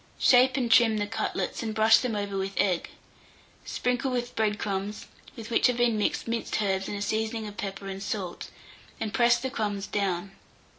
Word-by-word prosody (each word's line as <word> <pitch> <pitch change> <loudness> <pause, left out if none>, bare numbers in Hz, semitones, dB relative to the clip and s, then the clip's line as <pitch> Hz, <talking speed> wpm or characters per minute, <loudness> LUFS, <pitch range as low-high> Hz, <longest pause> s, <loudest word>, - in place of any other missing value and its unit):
Shape 260 +1 +5
and 240 -3 0
trim 225 -1 +6
the 205 - 0
cutlets, 225 +2 -3
and 220 -1 -3
brush 220 +1 +6
them 245 -4 -2
over 200 -1 -3
with 195 0 -3
egg. 180 -4 +1 0.8
Sprinkle 250 +2 -1
with 245 -1 -3
bread 215 -1 +1
crumbs, 200 +1 -3 0.3
with 225 0 -9
which 230 - +4
have 250 -1 0
been 240 -2 +3
mixed 210 - -1
minced 230 -1 -2
herbs 195 -2 0
and 205 - -4
a 200 - -3
seasoning 220 +1 -2
of 205 -1 -8
pepper 195 -1 -5
and 195 0 -6
salt, 195 -3 -4 0.5
and 215 -1 -3
press 235 0 +4
the 260 +2 -4
crumbs 205 -5 -2
down. 195 -2 -2
215 Hz, 190 wpm, -27 LUFS, 200-235 Hz, 0.8 s, trim